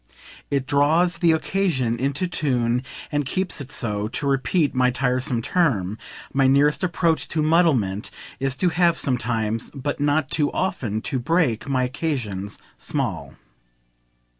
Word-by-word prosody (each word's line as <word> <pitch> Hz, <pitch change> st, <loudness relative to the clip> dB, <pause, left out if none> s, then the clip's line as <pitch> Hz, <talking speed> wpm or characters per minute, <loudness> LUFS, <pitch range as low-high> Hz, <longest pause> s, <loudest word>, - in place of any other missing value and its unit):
It 140 Hz, -2 st, 0 dB
draws 160 Hz, +5 st, +2 dB
the 170 Hz, -3 st, +4 dB
"occasion" 155 Hz, -8 st, 0 dB
into 140 Hz, +8 st, -1 dB
tune 125 Hz, -7 st, 0 dB, 0.3 s
and 145 Hz, -1 st, 0 dB
keeps 185 Hz, +3 st, -2 dB
it 135 Hz, 0 st, -9 dB
so, 105 Hz, -5 st, -2 dB
to 120 Hz, -, -3 dB
repeat 140 Hz, +3 st, +1 dB
my 125 Hz, -1 st, +3 dB
tiresome 125 Hz, -1 st, 0 dB
term; 110 Hz, -, +1 dB, 0.4 s
my 135 Hz, -1 st, +3 dB
nearest 145 Hz, +4 st, +3 dB
approach 170 Hz, -2 st, +1 dB
to 155 Hz, -, -1 dB
muddlement 140 Hz, -, +2 dB, 0.3 s
is 135 Hz, 0 st, 0 dB
to 180 Hz, +5 st, +1 dB
have 170 Hz, -1 st, +2 dB
sometimes 115 Hz, -4 st, -1 dB
but 140 Hz, +1 st, -3 dB
not 145 Hz, -1 st, +1 dB
too 150 Hz, -2 st, +2 dB
often 110 Hz, -, -2 dB
to 135 Hz, -, -2 dB
break 140 Hz, -4 st, 0 dB
my 130 Hz, -2 st, +1 dB
occasions 125 Hz, -, -3 dB, 0.2 s
small. -, -, -3 dB
140 Hz, 140 wpm, -23 LUFS, 120-160 Hz, 0.4 s, the